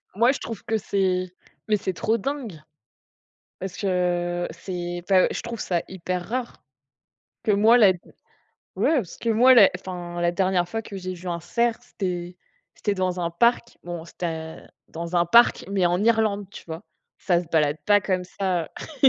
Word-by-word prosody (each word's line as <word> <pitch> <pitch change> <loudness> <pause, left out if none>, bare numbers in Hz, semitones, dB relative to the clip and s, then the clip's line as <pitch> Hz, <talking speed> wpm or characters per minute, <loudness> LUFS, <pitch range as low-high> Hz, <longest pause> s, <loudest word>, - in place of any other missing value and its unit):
moi, 235 +5 +5
je 280 - -4
trouve 225 - -7
que 220 -1 0
c'est 185 -3 -1 0.3
mais 215 -1 +3
c'est 190 -2 -3
trop 220 +6 0
dingue! 235 - -5 1.0
Parce 190 -1 -6
que 175 -2 0
c'est 175 -2 -5
enfin, 190 -2 +5
je - - -3
trouve 235 -1 -6
ça 175 -2 -1
hyper 180 -1 -4
rare, 245 0 -4 0.8
que 215 - +2
moi 220 +4 +6
la 205 -5 +6
d 175 - -11 0.8
ouais, 320 - +2
parce 205 - -3
que 230 - -3
moi, 245 +4 +6
la, 215 -6 +8
enfin, 175 -2 -6
la 175 0 +2
dernière 185 -1 +1
fois 225 +4 -3
que 205 - -8
j'ai 185 -1 -5
vu 180 +1 -8
un 170 -1 -2
cerf, 235 +6 0
c'était 180 -7 -5 0.4
c'était 205 - -1
dans 185 -1 -1
un 170 -1 -1
parc. 235 +7 +1
Bon, 175 -2 -6
c'était 175 +1 -5
un 160 -1 -6 0.2
dans 170 +2 -4
un 170 0 +3
parc, 235 +7 +5
mais 195 -3 +2
en 175 +3 +1
Irlande, 220 -3 +2
tu - - -11
vois? 165 0 -7 0.4
Ça 175 -3 +2
se - - -13
balade 150 -2 +2
pas 205 0 +5
comme 185 -2 -1
ça, 180 -2 -1 0.4
heu - - +10
185 Hz, 185 wpm, -24 LUFS, 175-220 Hz, 1.0 s, heu